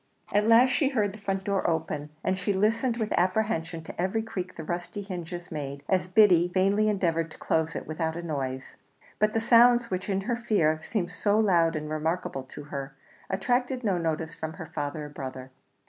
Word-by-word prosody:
At 210 +1 +3
last 235 +3 +6
she 280 -4 +2
heard 210 -7 0
the 215 - -10
front 195 -1 -2
door 195 -2 0
open, 150 -2 -2
and 190 - +1
she 195 +2 0
listened 225 +5 +1
with 220 -2 -2
apprehension 175 -3 0
to 165 - -6
every 190 +5 0
creak 185 -5 -5
the 160 - -6
rusty 175 +5 -4
hinges 175 -2 -6
made 140 -1 -5
as 185 -1 +1
Biddy 180 -3 +5
vainly 195 +4 +2
endeavoured 165 -5 0
to - - -13
close 160 0 0
it - - -4
without 160 0 -2
a 170 - -5
noise; 135 -5 -4 0.4
but 215 0 +2
the 225 - +2
sounds, 235 +1 +5
which, 185 +2 -3
in 195 -1 +1
her 235 +4 -1
fear, 200 -10 +1
seemed 180 +1 -2
so 205 +2 +1
loud 170 -6 +3
and 155 0 -3
remarkable 155 -2 -2
to 130 +3 -10
her, 135 -1 -5 0.3
attracted 245 +6 0
no 195 -5 +1
notice 160 -1 -2
from 160 -1 -5
her 160 - -8
father 150 0 -4
or - - -8
brother. 130 -2 -7
180 Hz, 195 wpm, -27 LUFS, 160-215 Hz, 0.4 s, last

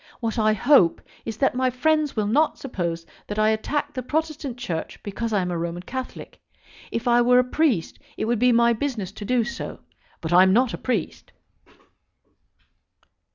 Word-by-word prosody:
What 230 -1 -2
I 215 0 +3
hope 215 - +4 0.3
is 225 -2 -5
that 270 - +2
my 255 +1 +1
friends 305 +3 +1
will 215 -2 0
not 290 +9 +2
suppose 170 -10 -4 0.2
that 205 - -5
I 215 0 +3
attack 290 +7 -1
the 255 - -3
Protestant 300 -2 -3
Church 165 -9 -4
because 225 +3 -4
I 200 -3 +1
am 180 - -3
a 175 - -2
Roman 170 +1 -4
Catholic. 260 +6 -7 0.5
If 230 - -3
I 240 0 +5
were 250 +1 +5
a 250 - +6
priest 250 - 0 0.2
it - - -1
would 235 0 0
be 250 +1 +4
my 235 0 +4
business 225 -6 -3
to 205 - -8
do 245 +1 +2
so; 235 +1 -6 0.4
but 160 +1 -3
I 180 - +8
am 190 0 +5
not 245 +2 +3
a - - -3
priest." 255 - -3
235 Hz, 185 wpm, -24 LUFS, 205-260 Hz, 0.5 s, I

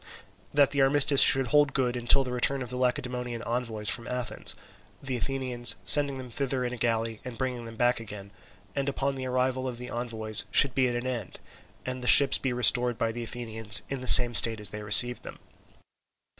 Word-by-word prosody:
That 140 -1 +1
the 140 -1 -1
armistice 140 0 +4
should 135 0 +5
hold 145 0 +1
good 125 -2 -2
until 120 +3 +2
the 125 -1 -7
return 130 +2 -1
of 125 - -11
the - - -7
Lacedaemonian 125 -1 -4
envoys 115 -3 -4
from 115 +3 +2
Athens—the 125 +1 -6
Athenians 125 -3 -1
sending 140 -2 +5
them 130 -2 -11
thither 130 0 -4
in 125 0 -5
a - - -8
galley 115 -1 -3
and 125 -3 -10
bringing 125 -3 -6
them 115 0 -11
back 120 +1 -1
again—and 100 +3 -10
upon 140 0 -4
the 130 -1 -7
arrival 130 +1 -3
of 125 -2 -7
the 125 +1 -11
envoys 110 -3 -4
should 140 -3 +3
be 130 -1 0
at 120 - -4
an 120 +1 -6
end, 120 -7 -7 0.5
and 130 0 -7
the 125 - -6
ships 140 +1 +5
be 130 - -4
restored 125 -1 +1
by 115 -2 -3
the 120 +1 -8
Athenians 110 -3 -2
in 135 -2 -6
the 130 - -8
same 120 -1 +9
state 115 -1 +4
as 105 -2 -3
they 105 - -9
received 120 +4 +3
them. - - -12
125 Hz, 200 wpm, -25 LUFS, 115-130 Hz, 0.5 s, same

